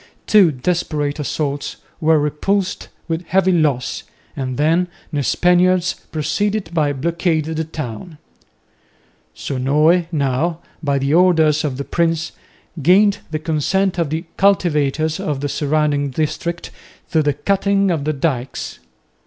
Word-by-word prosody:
Two 200 Hz, -6 st, +5 dB
desperate 150 Hz, 0 st, -2 dB
assaults 145 Hz, -1 st, -3 dB, 0.2 s
were 160 Hz, -1 st, +4 dB
repulsed 180 Hz, +7 st, -1 dB, 0.2 s
with 165 Hz, 0 st, -3 dB
heavy 190 Hz, +1 st, +3 dB
loss, 145 Hz, -7 st, 0 dB, 0.3 s
and 130 Hz, -3 st, -3 dB
then 165 Hz, +4 st, +2 dB, 0.3 s
the 145 Hz, -, 0 dB
Spaniards 180 Hz, +4 st, +3 dB, 0.2 s
proceeded 205 Hz, +7 st, -1 dB
to 155 Hz, -3 st, 0 dB
blockade 165 Hz, +2 st, 0 dB
the 160 Hz, 0 st, -2 dB
town. 155 Hz, -, -7 dB, 1.2 s
Sonoy 150 Hz, +6 st, +2 dB
now, 150 Hz, +2 st, 0 dB, 0.2 s
by 140 Hz, -3 st, 0 dB
the 140 Hz, +2 st, 0 dB
orders 160 Hz, -4 st, +4 dB
of 140 Hz, -4 st, -2 dB
the 140 Hz, -, -4 dB
prince, 165 Hz, 0 st, 0 dB, 0.5 s
gained 195 Hz, +7 st, +4 dB
the 155 Hz, -, -2 dB
consent 175 Hz, +5 st, 0 dB
of 165 Hz, -4 st, 0 dB
the 160 Hz, +3 st, -3 dB
cultivators 155 Hz, -5 st, +2 dB
of 145 Hz, -3 st, -2 dB
the 145 Hz, -, -2 dB
surrounding 145 Hz, 0 st, 0 dB
district 155 Hz, +4 st, -3 dB, 0.4 s
to 160 Hz, -3 st, +3 dB
the 145 Hz, -1 st, +1 dB
cutting 195 Hz, +4 st, +1 dB
of 160 Hz, -4 st, -1 dB
the 155 Hz, +1 st, 0 dB
dykes. 135 Hz, -3 st, -3 dB
155 Hz, 130 wpm, -19 LUFS, 145-175 Hz, 1.2 s, Two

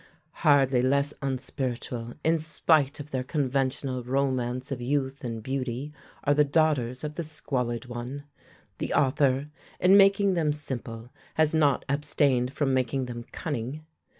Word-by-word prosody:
Hardly 135 Hz, -4 st, +4 dB
less 140 Hz, +3 st, +2 dB
unspiritual, 125 Hz, -3 st, -3 dB
in 165 Hz, +1 st, +3 dB
spite 155 Hz, -2 st, +2 dB
of 145 Hz, +1 st, -8 dB
their 130 Hz, -1 st, -1 dB
conventional 130 Hz, -2 st, -1 dB
romance 130 Hz, 0 st, -1 dB
of 130 Hz, -2 st, -3 dB
youth 135 Hz, +1 st, -1 dB
and 115 Hz, -3 st, -4 dB
beauty, 130 Hz, +2 st, -3 dB, 0.3 s
are 145 Hz, -, +3 dB
the 150 Hz, +1 st, +5 dB
daughters 140 Hz, -4 st, +1 dB
of 150 Hz, 0 st, -3 dB
the 170 Hz, -, -4 dB
squalid 130 Hz, -6 st, -3 dB
one. 125 Hz, +3 st, -6 dB, 0.6 s
The -, -, -2 dB
author, 135 Hz, 0 st, +2 dB, 0.3 s
in 185 Hz, +2 st, +6 dB
making 195 Hz, 0 st, +5 dB
them 155 Hz, -4 st, +1 dB
simple, 120 Hz, -5 st, -5 dB, 0.2 s
has 155 Hz, -1 st, +3 dB
not 145 Hz, -4 st, +3 dB
abstained 140 Hz, -3 st, +1 dB
from 140 Hz, -1 st, 0 dB
making 130 Hz, +1 st, 0 dB
them 120 Hz, -1 st, -7 dB
cunning. 145 Hz, 0 st, -4 dB
135 Hz, 140 wpm, -27 LUFS, 125-150 Hz, 0.6 s, in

